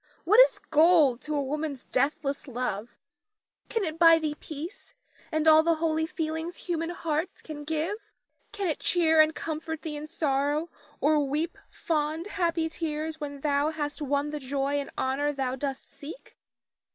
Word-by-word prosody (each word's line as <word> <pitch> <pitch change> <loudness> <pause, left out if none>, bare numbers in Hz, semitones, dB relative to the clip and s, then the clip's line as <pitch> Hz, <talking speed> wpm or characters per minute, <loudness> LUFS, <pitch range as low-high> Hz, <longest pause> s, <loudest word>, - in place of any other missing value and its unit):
What 420 +7 +5
is - - +7
gold 305 -6 +4
to 300 0 -3
a 285 - +1
woman's 290 -1 -3
deathless 275 +2 -1
love? 245 -3 -3 0.7
Can 455 -3 0
it 320 -2 -3
buy 330 -1 +8
thee 310 -2 -1
peace 320 - -8 0.4
and 315 0 +1
all 315 0 +8
the 335 +1 +2
holy 320 0 0
feelings 320 +1 -3
human 330 -2 -2
hearts 330 0 -3
can 300 -2 -7
give? 320 +6 -1 0.5
Can 405 -2 -2
it 315 - -1
cheer 320 -3 +4
and 310 0 +3
comfort 320 0 -4
thee 315 -3 -4
in 295 +1 -6
sorrow, 295 0 0 0.3
or 295 +1 +4
weep 310 +4 -1
fond, 315 +1 -1
happy 340 -5 0
tears 315 -1 -4
when 285 -1 -5
thou 290 0 +2
hast 300 -1 -4
won 285 +1 0
the 300 - -4
joy 275 +1 -1
and 280 - -5
honor 275 +3 0
thou 265 -2 -2
dost 270 0 -4
seek? 310 +12 -10
310 Hz, 165 wpm, -28 LUFS, 285-325 Hz, 0.7 s, buy